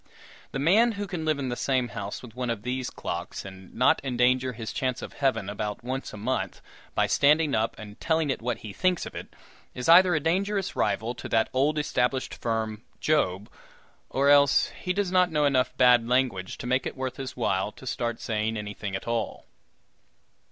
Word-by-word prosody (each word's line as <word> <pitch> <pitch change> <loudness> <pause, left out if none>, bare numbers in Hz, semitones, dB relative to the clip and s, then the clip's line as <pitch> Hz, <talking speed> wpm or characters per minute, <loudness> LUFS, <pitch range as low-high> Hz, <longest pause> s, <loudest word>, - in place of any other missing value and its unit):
The - - -3
man 210 - +4
who 205 0 -4
can 180 -4 -4
live 155 -2 +1
in 135 -2 -3
the 120 - -2
same 130 -1 0
house 100 0 -6
with 120 -3 -11
one 125 -1 -3
of 110 -3 -3
these 125 +1 -2
clocks, 85 +2 -5
and 95 -1 -11
not 125 - +3
endanger 125 0 +2
his 110 -1 -6
chance 130 -2 -2
of - - -7
heaven 135 -8 0
about 105 +2 -4
once 130 +2 -4
a - - -9
month 125 +6 -2 0.4
by - - +3
standing 150 +1 +3
up 110 -1 0
and 105 -1 -10
telling 160 -3 +1
it 130 - -3
what 125 +2 -2
he 105 - -7
thinks 185 - +1
of - - -8
it, - - -7 0.5
is 125 - -4
either 175 +1 +7
a - - +2
dangerous 195 +5 0
rival 115 +2 0
to 120 - -8
that 110 0 +2
old 145 +4 +2
established 130 -3 0
firm, 110 -2 -2 0.2
Job, 105 -11 +1 0.6
or 140 +1 +2
else 140 -1 +5
he 180 - -4
does 195 -1 0
not 180 -1 +4
know 150 -2 +1
enough 130 -3 +2
bad 125 -2 +5
language 125 -8 0
to - - -7
make 130 +2 +1
it - - -7
worth 130 -1 -4
his 130 -2 -6
while 100 -3 0
to - - -13
start 120 -2 -2
saying 110 0 -1
anything 105 -1 -5
at 95 - -6
all. 115 -1 -2
125 Hz, 200 wpm, -27 LUFS, 110-145 Hz, 0.6 s, either